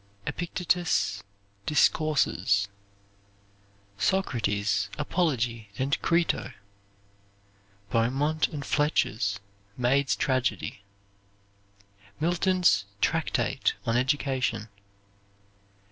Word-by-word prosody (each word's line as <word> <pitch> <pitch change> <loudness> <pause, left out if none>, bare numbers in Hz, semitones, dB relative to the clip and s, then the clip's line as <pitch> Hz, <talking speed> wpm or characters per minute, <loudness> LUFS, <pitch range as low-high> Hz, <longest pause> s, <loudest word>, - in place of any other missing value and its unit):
Epictetus' 175 - 0 0.5
Discourses. 150 -10 +2 1.3
Socrates' 105 - 0
"Apology 125 - -1
and 135 +2 0
Crito." 170 -6 +1 1.4
Beaumont 135 +8 +1
and 145 -3 -6
Fletcher's 125 -9 +1 0.4
"Maid's 125 -1 +2
Tragedy." 120 -5 -1 1.4
Milton's 175 - +2
Tractate - - 0
on 115 - +1
Education. 130 -4 0
130 Hz, 55 wpm, -27 LUFS, 110-155 Hz, 1.4 s, Discourses